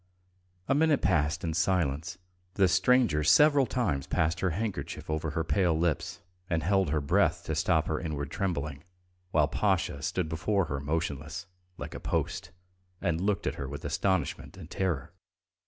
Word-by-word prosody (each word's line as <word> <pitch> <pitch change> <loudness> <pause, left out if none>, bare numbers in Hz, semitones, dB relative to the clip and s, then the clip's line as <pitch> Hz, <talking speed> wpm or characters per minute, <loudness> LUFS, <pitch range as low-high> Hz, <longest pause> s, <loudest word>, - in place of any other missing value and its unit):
A 135 - +3
minute 150 0 +3
passed 80 -5 +1
in 80 -2 -1
silence. 85 -1 0 0.4
The 95 -2 +4
stranger 95 -3 +3
several 140 - +5
times 90 - -1
passed 80 +2 0
her 95 - +1
handkerchief 100 -3 -4
over 80 +1 -1
her 80 +2 -1
pale 85 -1 +2
lips 85 +3 -1 0.3
and 80 -3 0
held 95 0 +2
her 75 +1 +1
breath 70 - +2
to 80 - -3
stop 80 +1 +2
her 80 - -1
inward 75 -4 -4
trembling, 75 -7 -3 0.5
while 75 -4 +3
Pasha 85 -4 0
stood 90 +3 -1
before 95 +5 0
her 70 -2 -3
motionless, 75 +1 -3 0.3
like - - -7
a - - -6
post, - - -2 0.5
and 85 -3 -1
looked 100 +1 0
at - - 0
her 70 - -4
with 75 +1 -7
astonishment 95 -2 -1
and 90 -2 -11
terror. 90 -8 -2
85 Hz, 160 wpm, -29 LUFS, 75-95 Hz, 0.5 s, several